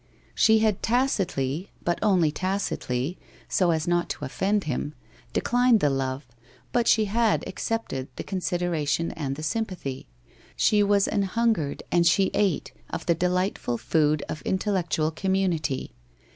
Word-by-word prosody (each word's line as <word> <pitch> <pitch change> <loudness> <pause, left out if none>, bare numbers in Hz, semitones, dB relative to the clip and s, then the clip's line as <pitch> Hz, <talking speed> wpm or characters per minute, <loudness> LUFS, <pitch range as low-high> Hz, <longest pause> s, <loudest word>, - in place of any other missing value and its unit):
She 220 0 +5
had 210 -3 +1
tacitly 190 - 0
— - - -28
but 175 -1 0
only 185 -7 +3
tacitly, 180 -6 -2 0.3
so 180 -2 +2
as 160 -1 0
not 175 0 +1
to 145 - -4
offend 195 +9 0
him 150 +1 -3 0.2
— - - -28
declined 245 -1 +3
the 145 -6 +2
love, 135 0 -2 0.5
but 240 -1 +1
she 220 -2 +4
had 225 +2 +1
accepted 225 -13 -3
the - - -5
consid 180 -2 -2
eration 165 -1 0
and 140 -4 -3
the 155 - -7
sympathy. 175 - -3 0.5
She 210 -1 +3
was 200 -1 +3
an 205 - 0
hungered 200 -7 0
and 170 -1 +4
she 190 +3 +3
ate, 195 -6 0 0.2
of - - -5
the 170 - +3
delightful 180 - 0
food 150 +1 +1
of 155 - -5
intellectual 185 -5 0
community. 170 -6 -1
180 Hz, 150 wpm, -26 LUFS, 150-205 Hz, 0.5 s, She